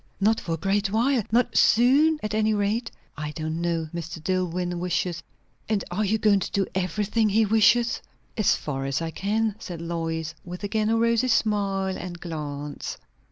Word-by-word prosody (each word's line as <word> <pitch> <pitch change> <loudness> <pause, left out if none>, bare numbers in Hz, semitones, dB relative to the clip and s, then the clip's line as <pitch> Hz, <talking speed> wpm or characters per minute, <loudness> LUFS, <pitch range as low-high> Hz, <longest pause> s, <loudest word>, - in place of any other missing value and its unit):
"Not 220 +3 +3
for 165 - -3
a - - -1
great 195 +4 0
while? 240 +4 +2
Not 245 +2 +2
soon, 280 +7 +5
at 215 -1 -2
any 215 0 +2
rate?" 205 +4 0 0.3
"I 150 0 -4
don't 160 +1 -3
know. 165 -2 -1
Mr. 170 0 -5
Dillwyn 180 -1 -1
wishes 175 -1 -1 0.2
" - - -31
"And 210 -3 +1
are 200 +5 0
you 215 +2 +1
going 210 -2 +4
to - - -3
do 195 -1 +1
everything 210 +4 0
he 220 +2 +3
wishes?" 225 +3 +3 0.3
"As 215 -4 +3
far 135 -2 -4
as 135 0 -1
I 165 -1 -3
can," 215 +4 0
said 175 -7 -7
Lois, 165 -1 -3
with 180 +2 -8
again 215 +1 0
a 225 - +3
rosy 230 +2 +2
smile 200 -5 +1
and 175 -1 -7
glance. 150 -3 -5
195 Hz, 180 wpm, -25 LUFS, 170-220 Hz, 0.3 s, soon